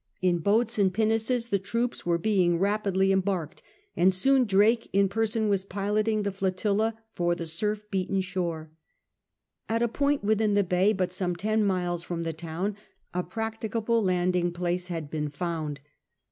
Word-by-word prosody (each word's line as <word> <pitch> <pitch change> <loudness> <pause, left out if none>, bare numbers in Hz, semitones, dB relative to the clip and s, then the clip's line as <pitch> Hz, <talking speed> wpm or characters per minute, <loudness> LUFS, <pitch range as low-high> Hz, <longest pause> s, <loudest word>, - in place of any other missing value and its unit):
In 180 -2 +2
boats 220 +6 +1
and 195 -2 +4
pinnaces 225 +4 +1
the 200 - +1
troops 230 +2 -3
were 170 -1 +3
being 180 -2 +2
rapidly 195 0 +1
em 190 0 +3
barked, 180 -4 -3 0.3
and 185 +2 +4
soon 260 +8 +3
Drake 215 +3 +3
in 200 0 +3
person 220 +2 0
was 200 -2 +1
piloting 210 +2 0
the 200 - -1
flotilla 200 +3 0 0.2
for 175 0 0
the 170 - -5
surf 210 +6 0
beaten 195 0 0
shore. 170 -4 -3 1.0
At 230 +1 +1
a - - +3
point 280 +3 0
within 215 0 +2
the 205 - +4
bay, 185 +3 +2
but 185 -3 -1
some 180 -2 -1
ten 215 +4 0
miles 180 -3 0
from 170 -1 -4
the 165 -1 -3
town, 170 +5 -4 0.4
a 180 - 0
practicable 225 +2 -2
landing 180 -2 +1
place 175 +1 -2
had 165 -5 -5
been 150 -1 -2
found. 155 -2 -4
195 Hz, 165 wpm, -27 LUFS, 175-215 Hz, 1.0 s, and